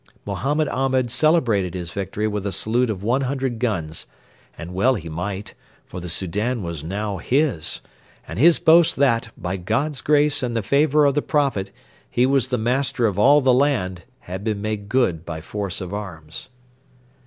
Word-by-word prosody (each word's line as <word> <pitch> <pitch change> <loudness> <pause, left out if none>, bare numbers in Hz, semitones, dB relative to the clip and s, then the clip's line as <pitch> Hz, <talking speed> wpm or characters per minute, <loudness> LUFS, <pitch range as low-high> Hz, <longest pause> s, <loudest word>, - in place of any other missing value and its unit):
Mohammed 150 +3 0
Ahmed 130 -2 0
celebrated 120 - +2
his 85 -2 -5
victory 100 +4 -2
with 105 -1 -3
a - - -2
salute 120 +5 +1
of 100 -3 -4
one 125 +5 +1
hundred 130 -3 -2
guns; 85 -10 -2 0.5
and 85 +2 -8
well 125 +8 +3
he 85 -6 -6
might, 95 +5 -5 0.3
for - - -8
the 90 0 -6
Soudan 105 +7 -1
was 85 -3 -5
now 100 +4 -3
his, 135 - 0 0.5
and 85 - -6
his 165 +4 +6
boast 170 +1 +5
that, 120 -4 +2
by 90 +2 -3
God's 140 - -1
grace 150 -1 +3
and 120 -2 -2
the 110 - -1
favour 150 +5 +3
of 140 - +3
the 150 - +1
Prophet, 135 -12 0 0.4
he 125 - +2
was 135 -2 +2
the 125 - -1
master 125 +1 +1
of 105 -3 0
all 145 +7 +6
the 130 -1 +4
land 120 -10 +1 0.2
had 95 +2 -7
been 110 -2 -1
made 105 -1 -4
good 100 -11 +1
by 85 -3 -6
force 100 +3 -4
of 95 -1 -6
arms. 85 -6 -7
110 Hz, 175 wpm, -22 LUFS, 95-135 Hz, 0.5 s, his